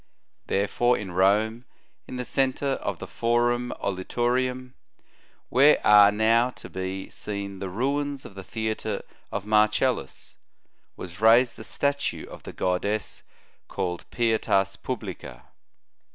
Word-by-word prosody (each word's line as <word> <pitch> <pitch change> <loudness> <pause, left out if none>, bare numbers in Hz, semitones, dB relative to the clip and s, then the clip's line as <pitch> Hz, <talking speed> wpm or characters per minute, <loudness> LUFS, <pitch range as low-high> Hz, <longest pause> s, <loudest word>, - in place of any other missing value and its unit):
Therefore 120 +5 +1
in 95 -3 -6
Rome, 105 +6 +2 0.4
in - - -7
the 125 0 -3
centre 135 +2 0
of - - -3
the - - -7
Forum 120 +1 0
olitorium, 125 +6 -1 0.8
where 140 +5 +5
are 105 -1 +8
now 115 +3 +3
to - - -11
be 95 +1 -4
seen 100 -2 -5
the 95 -1 -4
ruins 140 +6 -2
of - - -10
the 95 0 -9
theatre 110 +3 -3 0.3
of 100 0 -4
Marcellus, 105 0 +1 0.6
was 90 +1 -9
raised 115 +3 +5
the - - -10
statue 140 +4 -1
of - - -11
the - - -8
goddess 100 +4 -2 0.5
called 90 -3 -4
Pietas 110 -4 +1
publica. 100 -2 -6
110 Hz, 125 wpm, -26 LUFS, 100-125 Hz, 0.8 s, are